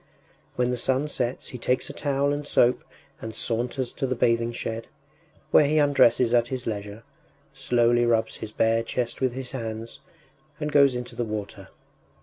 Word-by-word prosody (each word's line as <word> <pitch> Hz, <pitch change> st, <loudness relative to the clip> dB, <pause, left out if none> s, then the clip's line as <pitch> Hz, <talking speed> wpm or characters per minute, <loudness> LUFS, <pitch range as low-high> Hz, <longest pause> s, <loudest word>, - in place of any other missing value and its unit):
When 125 Hz, 0 st, +1 dB
the 125 Hz, -, -1 dB
sun 130 Hz, +4 st, +1 dB
sets 125 Hz, -4 st, -3 dB
he 125 Hz, -, -8 dB
takes 125 Hz, +2 st, 0 dB
a 140 Hz, -, -7 dB
towel 140 Hz, 0 st, 0 dB
and 145 Hz, 0 st, -4 dB
soap 125 Hz, -2 st, +3 dB, 0.4 s
and 110 Hz, -1 st, -6 dB
saunters 120 Hz, +3 st, 0 dB
to 135 Hz, -, -2 dB
the 130 Hz, -, -1 dB
bathing 115 Hz, 0 st, +1 dB
shed, 115 Hz, -1 st, -5 dB, 0.6 s
where 145 Hz, -, +6 dB
he 155 Hz, +2 st, +1 dB
undresses 130 Hz, -5 st, +4 dB
at 120 Hz, -1 st, +3 dB
his 130 Hz, 0 st, -5 dB
leisure, 105 Hz, 0 st, -5 dB, 0.5 s
slowly 120 Hz, -3 st, +2 dB
rubs 115 Hz, -1 st, +1 dB
his 110 Hz, -, -7 dB
bare 115 Hz, +1 st, +2 dB
chest 120 Hz, +2 st, -3 dB
with 130 Hz, -2 st, +1 dB
his 130 Hz, -1 st, -5 dB
hands, 115 Hz, -3 st, -6 dB, 0.6 s
and 150 Hz, 0 st, -3 dB
goes 140 Hz, -3 st, +5 dB
into 125 Hz, 0 st, -6 dB
the 120 Hz, -, -1 dB
water. 105 Hz, -3 st, -6 dB
120 Hz, 170 wpm, -25 LUFS, 115-135 Hz, 0.6 s, where